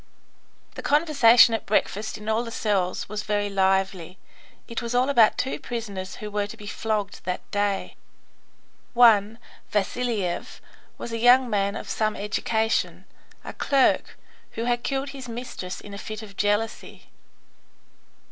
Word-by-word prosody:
The - - -7
conversation 275 -6 +5
at 225 - -3
breakfast 215 0 0
in 210 0 -11
all 220 +2 +1
the 235 - -6
cells 200 -5 -1
was 210 0 -4
very 205 -1 -1
lively. 190 -2 0 0.5
It 230 - -4
was 235 0 -3
all 255 +3 +3
about 230 -6 +5
two 265 - -2
prisoners 205 -6 -5
who 210 0 -7
were 205 0 -1
to - - -10
be 210 - -11
flogged 210 -1 -3
that 180 0 -3
day. 205 -1 -1 1.0
One, 225 -3 +5 0.3
Vasiliev, 210 -3 -2 0.4
was 235 - -7
a 230 - -3
young 245 +1 +5
man 200 0 0
of - - -6
some 215 -1 -1
education, 220 +2 -1 0.4
a - - -7
clerk, 275 -2 +1 0.4
who 225 - -3
had 240 0 0
killed 275 +1 -2
his 265 -3 -8
mistress 230 -6 -6
in 205 - -11
a 200 - -7
fit 215 +1 -7
of 200 -2 -12
jealousy. 205 +3 -2
215 Hz, 145 wpm, -25 LUFS, 200-240 Hz, 1.0 s, conversation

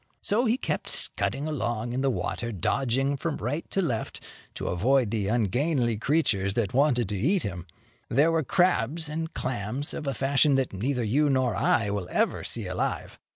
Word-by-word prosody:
So 220 +5 +1
he 230 +3 +2
kept - - -3
scudding 140 +3 -1
along 120 -6 -2
in 130 - -1
the 135 - +2
water, 115 +2 -2
dodging 135 - 0
from 155 +2 -2
right 140 +9 -3
to 195 - 0
left, 120 -9 -2 0.4
to - - -4
avoid 120 +5 +2
the 105 -4 -1
ungainly 120 - +1
creatures 105 -6 +1
that 110 -5 0
wanted 125 -4 +3
to 105 - -2
eat 175 - +2
him. 95 -3 -5 0.4
There 145 +7 +4
were 165 -1 +2
crabs 160 -1 +1
and 160 +1 -3
clams, 125 +3 -3
of 150 - -5
a 135 - -1
fashion 140 +3 +3
that 135 -5 0
neither 125 +6 -1
you 140 +7 +2
nor 130 -3 +1
I 100 -3 +2
will 100 -3 -3
ever - - 0
see - - -4
alive. - - -3
130 Hz, 180 wpm, -27 LUFS, 110-150 Hz, 0.4 s, There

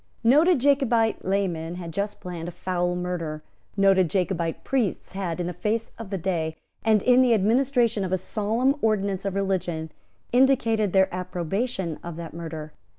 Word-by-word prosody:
Noted 300 +9 +5
Jacobite 245 -5 +2
laymen 175 -4 -1
had 170 -2 -7
just 205 +4 -3
planned 175 -2 -6
a - - -4
foul 180 0 -1
murder. 170 -4 -4 0.3
Noted 195 -3 +4
Jacobite 175 -3 -1
priests 245 -9 -1
had, 180 -3 -3
in 175 - -1
the 180 - -3
face 215 +6 -2
of 225 -4 -7
day, 160 -4 -1 0.3
and 215 -2 +3
in 250 0 +5
the 245 -3 +5
administration 235 0 +2
of 185 - -3
a 185 - +2
solemn 225 +8 0
ordinance 200 -3 0
of 195 -1 -2
religion, 175 -5 -1 0.4
indicated 235 -5 +3
their 190 0 +3
approbation 180 0 -2
of 170 -1 -6
that 165 -1 -7
murder. 160 -2 -7
190 Hz, 155 wpm, -25 LUFS, 175-225 Hz, 0.4 s, Noted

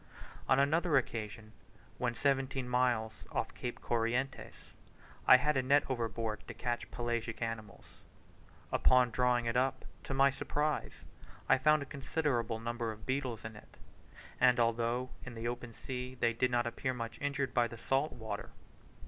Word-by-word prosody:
On 130 - +5
another 150 +3 +3
occasion, 110 -3 -3 0.5
when 120 -1 0
seventeen 135 -1 0
miles 125 -3 +1 0.2
off - - -2
Cape 120 - -5
Corrientes, 120 +3 -2 0.5
I 130 - +10
had 150 +4 +1
a 130 - +3
net 140 +3 +4
overboard 115 -3 -2
to - - -7
catch 120 -1 -3
pelagic 120 -1 -3
animals. 115 -3 -5 0.9
Upon 125 -1 +4
drawing 125 0 +2
it 115 0 -1
up, 130 +1 +1 0.2
to 135 - -3
my 135 +1 +5
surprise, 150 +2 -2 0.4
I - - +5
found 150 +1 +4
a - - -8
considerable 135 -5 -1
number 120 0 -2
of 110 0 -11
beetles 130 -4 -2
in 110 -1 -6
it, 105 - -15 0.6
and 125 -1 +5
although 120 +2 +1
in 130 -2 -8
the 115 +1 -3
open 120 -1 -5
sea, 125 0 -5
they 115 0 +2
did 125 +2 +1
not 120 -1 +1
appear 125 +2 -2
much 115 -2 -6
injured 140 -2 -1
by 120 -1 +3
the 115 - -9
salt 135 +6 0
water. 110 -2 -6
125 Hz, 155 wpm, -33 LUFS, 115-135 Hz, 0.9 s, I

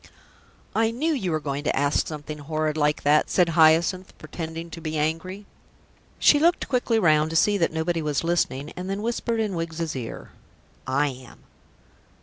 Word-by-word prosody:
"I 225 0 +2
knew 295 +8 -1
you 195 -11 -2
were 155 -2 0
going 145 -1 -4
to 150 - 0
ask 145 +2 +1
something 150 -1 -7
horrid 155 +1 -2
like 150 -1 0
that," 150 +1 +3
said 180 -2 +3
Hyacinth, 165 +4 +3
pretending 165 +1 -7
to 165 - -8
be 155 -1 -3
angry. 165 +6 -2 0.7
She 290 - +5
looked 340 +3 +2
quickly 245 -3 +1
round 155 -6 +3
to 165 - -5
see 205 +5 +4
that 165 - +1
nobody 165 +1 -1
was 150 -2 -1
listening, 155 -4 -1
and 180 +1 -6
then 200 +2 -3
whispered 235 0 -1
in 215 -3 -1
Wiggs's 165 -2 -3
ear, 120 -3 -7 0.6
"I 140 +3 +1
am." 130 -2 -12
160 Hz, 170 wpm, -24 LUFS, 150-185 Hz, 0.7 s, She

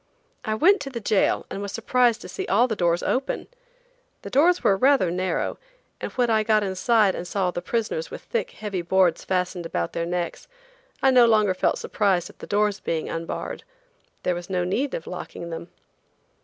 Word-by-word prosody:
I 215 -1 -1
went 380 - +4
to 275 - -5
the 245 -3 -5
jail 210 -2 +1
and 195 - -4
was 200 -1 -4
surprised 235 +1 +2
to - - -8
see - - -5
all 230 +6 +4
the 220 - -2
doors 175 -2 +1
open. 265 +2 -1 0.8
The - - -7
doors 340 +7 +4
were 195 - +4
rather 260 -5 +3
narrow, 185 +1 -2 0.4
and - - -5
when 245 -2 +2
I 220 -1 +4
got 215 -1 +2
inside 200 +1 +2
and 175 - -5
saw 195 +1 -1
all 180 - +1
the 175 - -4
prisoners 230 - -2
with - - -9
thick, 480 +1 -2
heavy 205 - -4
boards 180 0 +2
fastened 180 -2 -1
about 85 - -2
their 170 0 -2
necks, 175 0 -3 0.6
I 265 - +6
no 245 -2 +6
longer 215 -4 +4
felt 185 - +1
surprised 190 -4 0
at - - -30
the - - -9
doors 210 0 +1
being 160 -1 -2
unbarred. 165 - -4 0.6
There 180 - +1
was 175 +1 -6
no 180 -2 0
need 255 +10 -1
of 165 - -6
locking 170 -1 -7
them. 165 +1 -6
200 Hz, 195 wpm, -24 LUFS, 180-235 Hz, 0.8 s, I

